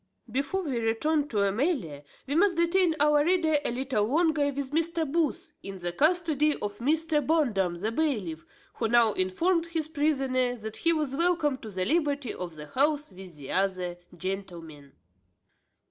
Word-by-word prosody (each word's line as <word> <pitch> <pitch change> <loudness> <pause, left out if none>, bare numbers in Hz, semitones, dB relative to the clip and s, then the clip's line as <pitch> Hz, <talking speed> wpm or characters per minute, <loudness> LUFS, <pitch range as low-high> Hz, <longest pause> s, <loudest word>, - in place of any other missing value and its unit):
_ - - -14
Before 280 +9 -1
we 270 -7 -2
return 285 +7 0
to 205 -6 +1
Amelia 195 - -1 0.2
we 280 - -3
must 355 +2 +3
detain 340 0 +3
our 295 0 +4
reader 325 -2 +2
a - - -1
little 245 -4 -1
longer 310 +1 +2
with 280 -1 -5
Mr. 330 +1 +1
Booth, 310 0 -1
in 195 -1 -7
the 175 -1 -1
custody 305 - +2
of 205 0 -5
Mr. 305 +3 +1
Bondum 220 - +1
the 215 +4 -1
bailiff, 215 - -1 0.3
who 225 - 0
now 230 -1 +4
informed 330 - 0
his 325 -2 -2
prisoner 270 -5 0
that 220 -2 -6
he 335 - +2
was 300 -5 -1
welcome 325 -4 +1
to 220 - -8
the 185 -2 -2
liberty 290 - 0
of 175 -3 -6
the 150 -1 -8
house 290 - 0
with 185 -3 -11
the 140 -2 -8
other 185 -2 0 0.2
gentlemen. 170 -6 -6
275 Hz, 165 wpm, -28 LUFS, 200-315 Hz, 0.3 s, our